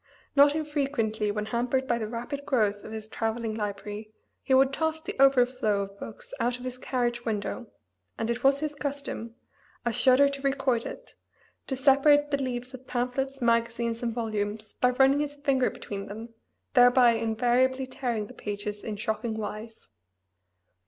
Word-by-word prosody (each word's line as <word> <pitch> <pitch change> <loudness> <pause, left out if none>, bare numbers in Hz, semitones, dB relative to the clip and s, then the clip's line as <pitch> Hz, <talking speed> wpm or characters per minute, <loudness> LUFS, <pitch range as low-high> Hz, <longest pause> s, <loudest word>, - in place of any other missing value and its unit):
Not 285 +1 +6
infrequently 275 -9 -1
when 210 +1 -2
hampered 245 +4 0
by 235 -2 +1
the 215 - -3
rapid 240 +5 -5
growth 210 -7 +1
of - - -8
this 220 -1 -6
travelling 225 0 -2
library 210 0 -5 0.3
he - - -6
would 270 +1 +4
toss 320 +1 0
the 315 - -6
"overflow" 250 -6 +4
of 195 0 -10
books - - -9
out 245 +1 +1
of 250 - -11
his 255 0 -5
carriage 240 -2 -1
window, 225 +1 -3 0.5
and 225 - -2
it 235 +1 -2
was 275 +1 +4
his 305 -1 -2
custom 280 -5 -4 0.5
(I 235 - +2
shudder 260 +4 +5
to 280 0 -4
record 270 -4 0
it!) - - -10 0.5
to 265 - -2
separate 290 +2 +4
the 280 -1 +1
leaves 250 0 -4
of 260 0 -11
pamphlets, 260 +2 -2
magazines, 235 0 +1
and 235 -1 -1
volumes 215 -2 -3
by 250 - +2
running 270 +3 +4
his 290 -1 -2
finger 275 -3 +1
between 200 0 -7
them, 220 +3 -7 0.4
thereby 245 -1 +6
invariably 245 +4 +1
tearing 245 -4 -3
the - - -12
pages 205 0 -5
in 215 - -4
shocking 220 +1 -2
wise. 220 +1 -6
245 Hz, 165 wpm, -27 LUFS, 220-270 Hz, 0.5 s, Not